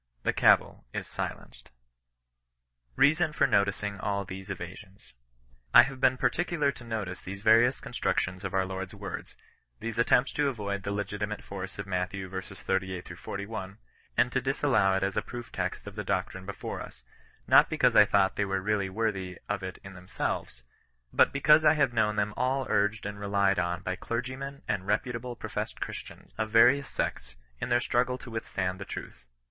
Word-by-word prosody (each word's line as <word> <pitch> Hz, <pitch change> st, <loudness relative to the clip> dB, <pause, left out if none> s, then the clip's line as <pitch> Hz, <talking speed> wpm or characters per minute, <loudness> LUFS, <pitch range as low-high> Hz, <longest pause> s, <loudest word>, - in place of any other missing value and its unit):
The -, -, +1 dB
cavil -, -, +4 dB
is -, -, -2 dB
sUenced. -, -, -6 dB, 1.3 s
BEASON 155 Hz, +2 st, +4 dB
FOB -, -, +3 dB
NOTICING 100 Hz, 0 st, +1 dB
ALL 100 Hz, 0 st, -1 dB
THESE 95 Hz, +1 st, -8 dB
EVASIONS. 95 Hz, +1 st, -9 dB, 0.6 s
I -, -, +12 dB
have 135 Hz, -1 st, -6 dB
been 130 Hz, -, +4 dB
particular 165 Hz, -2 st, +1 dB
to 130 Hz, -, -13 dB
notice 110 Hz, -6 st, -4 dB
these 100 Hz, +1 st, -7 dB
various 115 Hz, +4 st, +5 dB
con -, -, -10 dB
structions 90 Hz, +1 st, -1 dB
of 95 Hz, -1 st, -3 dB
our 95 Hz, 0 st, +2 dB
Lord's 95 Hz, 0 st, -5 dB
words, 100 Hz, -2 st, -7 dB, 0.4 s
these 115 Hz, +1 st, -4 dB
attempts 125 Hz, +2 st, +4 dB
to 145 Hz, -1 st, +1 dB
avoid 100 Hz, -6 st, -2 dB
the 100 Hz, -, -3 dB
legitimate 105 Hz, +1 st, -3 dB
force 95 Hz, -1 st, -7 dB
of 100 Hz, -, -4 dB
Matt. 90 Hz, -1 st, -1 dB
v. -, -, -4 dB
38—41, 95 Hz, +1 st, -4 dB, 0.4 s
and -, -, +3 dB
to -, -, +1 dB
disallow 95 Hz, 0 st, +2 dB
it 95 Hz, -, 0 dB
as 100 Hz, 0 st, -1 dB
a -, -, +3 dB
proof 120 Hz, -1 st, -8 dB
text 95 Hz, 0 st, -3 dB
of 105 Hz, -, -8 dB
the 105 Hz, -, -3 dB
doctrine 95 Hz, 0 st, -2 dB
before 100 Hz, -, -5 dB
us; -, -, -11 dB, 0.4 s
not -, -, +6 dB
because -, -, +3 dB
I -, -, +9 dB
thought 95 Hz, -1 st, +2 dB
them 100 Hz, -1 st, 0 dB
really 95 Hz, +1 st, 0 dB
worthy 95 Hz, -3 st, -2 dB
of 100 Hz, -1 st, -2 dB
it 95 Hz, -1 st, -6 dB
in 95 Hz, -, -9 dB
themselves; 90 Hz, -8 st, -4 dB, 0.5 s
but -, -, +5 dB
be 140 Hz, -, -3 dB
cause 150 Hz, +2 st, +7 dB
I 155 Hz, 0 st, +6 dB
have 140 Hz, -5 st, +2 dB
known 105 Hz, -2 st, +2 dB
them 105 Hz, 0 st, 0 dB
all 130 Hz, +1 st, 0 dB
urged 105 Hz, +1 st, +1 dB
and 105 Hz, 0 st, -5 dB
relied 100 Hz, -1 st, +2 dB
on 85 Hz, +1 st, -1 dB
by 90 Hz, 0 st, -2 dB
clergymen 130 Hz, +4 st, -4 dB
and 95 Hz, -1 st, -2 dB
reputable 120 Hz, +3 st, -1 dB
professed -, -, -5 dB
Christians, -, -, -7 dB
of 110 Hz, 0 st, 0 dB
various 120 Hz, +5 st, +5 dB
sects, 65 Hz, -1 st, -3 dB, 0.2 s
in -, -, -3 dB
their 120 Hz, 0 st, +4 dB
struggle 125 Hz, +1 st, +1 dB
to 125 Hz, -1 st, -11 dB
withstand 95 Hz, -4 st, -3 dB
the -, -, -4 dB
truth. -, -, -8 dB
100 Hz, 175 wpm, -29 LUFS, 95-120 Hz, 1.3 s, I